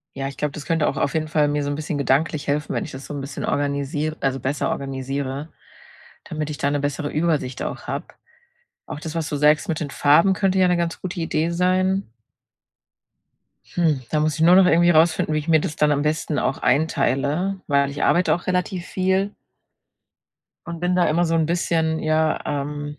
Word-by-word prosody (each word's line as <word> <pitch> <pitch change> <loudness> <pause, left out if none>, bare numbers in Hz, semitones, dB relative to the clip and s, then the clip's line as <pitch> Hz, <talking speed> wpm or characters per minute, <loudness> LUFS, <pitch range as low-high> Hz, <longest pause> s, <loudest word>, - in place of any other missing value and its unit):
ja, 135 0 -3
ich 140 - -8
glaube, 150 -1 -1
das 145 -1 -8
könnte 165 -2 +1
auch 140 - -2
auf 140 - 0
jeden 155 -1 -1
Fall 150 -1 +2
mir 145 0 -1
so 145 - -2
'n 145 - -2
bisschen 150 -1 -3
gedanklich 145 +2 0
helfen, 145 +1 -1
wenn - - -1
ich 150 - -9
das 130 +1 -9
so - - -7
'n 140 - -4
bisschen 140 +1 -5
organisier 145 +2 -1
also, 135 -1 -1
besser 140 +3 -1
organisiere, 135 +2 -4 0.8
damit 155 -1 -4
ich 145 - -5
da 140 - 0
'ne 145 - 0
bessere 145 +1 -2
Übersicht 150 -5 -1
auch - - -5
habe. - - -3 0.8
Auch 150 - -6
das, 160 0 -7
was 160 -1 -2
du 150 - -2
sagst, 150 +6 +3
mit 160 - -1
den 145 - -4
Farben 165 +7 +4
könnte 190 0 +1
ja 185 - +5
'ne 180 -1 +2
ganz 170 -1 -2
gute 180 -1 -5
Idee 165 0 0
sein. 185 - +1 1.6
Hm, 160 -6 +1
da 155 - +1
muss 155 -1 +1
ich 160 - -4
nur 175 +3 +7
noch 190 -1 +7
irgendwie 175 0 +5
rausfinden, 160 -1 +3
wie 155 - +1
ich 150 - -8
mir 160 -1 +5
das 150 - -4
dann 150 0 +2
am 145 0 +1
besten 150 -1 -1
auch 135 - -1
einteile, 160 +5 +1
weil 140 -1 +2
ich 145 +1 -4
arbeite 175 +5 +3
auch 175 - -4
relativ 180 0 -1
viel 190 +2 0 1.3
und 170 -1 -6
bin 180 +1 0
da 180 - +3
immer 170 +3 +2
so 165 0 0
'n 160 -1 +2
bisschen, 160 -1 0
ja, 155 0 +1
ähm 145 +1 -4
155 Hz, 210 wpm, -22 LUFS, 145-170 Hz, 1.6 s, nur